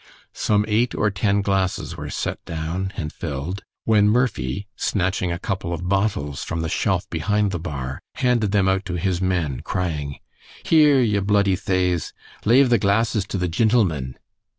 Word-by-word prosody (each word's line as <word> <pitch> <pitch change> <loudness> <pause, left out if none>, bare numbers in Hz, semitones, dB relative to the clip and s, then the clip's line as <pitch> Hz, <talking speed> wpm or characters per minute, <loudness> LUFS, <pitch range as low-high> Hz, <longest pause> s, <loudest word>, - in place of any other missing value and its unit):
Some 105 -1 +1
eight 110 +3 +1
or 105 - +1
ten 100 +1 +1
glasses 95 -2 -1
were - - -6
set - - -3
down 85 +4 -3
and 75 -2 -4
filled, 80 +5 -4 0.2
when 105 -2 +4
Murphy, 105 - 0
snatching 90 -2 0
a 85 - -2
couple 90 -1 -3
of 90 +1 -4
bottles 95 -8 0
from 85 - -3
the 80 - -2
shelf - - 0
behind 105 0 +1
the 85 - -3
bar, 70 -5 -5
handed 120 -5 +1
them 100 -2 +3
out 95 0 +1
to 90 -1 -3
his 90 0 -1
men, 85 -8 0
crying, 75 -6 -3 0.5
"Here, 150 -4 +5
ye 105 -5 +2
bluddy 100 -1 +2
thaves, 90 -3 0 0.3
lave 125 +3 +5
the 120 - +5
glasses 105 0 +1
to 100 - -3
the 90 -1 0
gintlemen!" 85 - +1
95 Hz, 165 wpm, -22 LUFS, 85-105 Hz, 0.5 s, Here